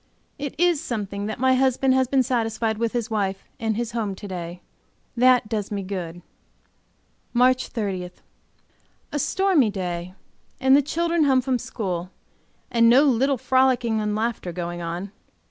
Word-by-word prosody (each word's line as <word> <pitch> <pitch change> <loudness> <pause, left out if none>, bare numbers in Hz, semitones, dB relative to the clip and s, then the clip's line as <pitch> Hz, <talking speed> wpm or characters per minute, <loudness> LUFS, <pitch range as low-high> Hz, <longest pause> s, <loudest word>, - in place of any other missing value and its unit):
It 285 -1 -4
is 350 -4 +3
something 205 - -4
that 215 - -4
my 260 0 +4
husband 260 0 +2
has 260 -1 +2
been 265 0 +3
satisfied 225 -3 -1
with 230 -1 -1
his 235 -2 -2
wife 195 -3 -1
and 220 -2 -1
his 235 -1 -2
home 220 -4 -2
to 205 - -9
day; 175 -1 -6 0.5
that 250 -1 +4
does 210 -2 -3
me 200 -1 -2
good. 175 -3 -6 1.1
MARCH 255 +1 +3
30. 195 -5 -3 1.0
A 295 - -2
stormy 360 - +2
day 180 -2 -4 0.4
and 265 0 +5
the 285 - +6
children 335 +2 +1
home 265 -2 +4
from 255 -1 0
school, 180 -6 -4 0.6
and 230 -1 +5
no 255 +4 +6
little 270 0 +2
frolicking 250 -3 +2
and 210 0 -1
laughing 220 -5 -2
going 175 -1 -4
on. 175 +4 -5
230 Hz, 155 wpm, -24 LUFS, 195-260 Hz, 1.1 s, the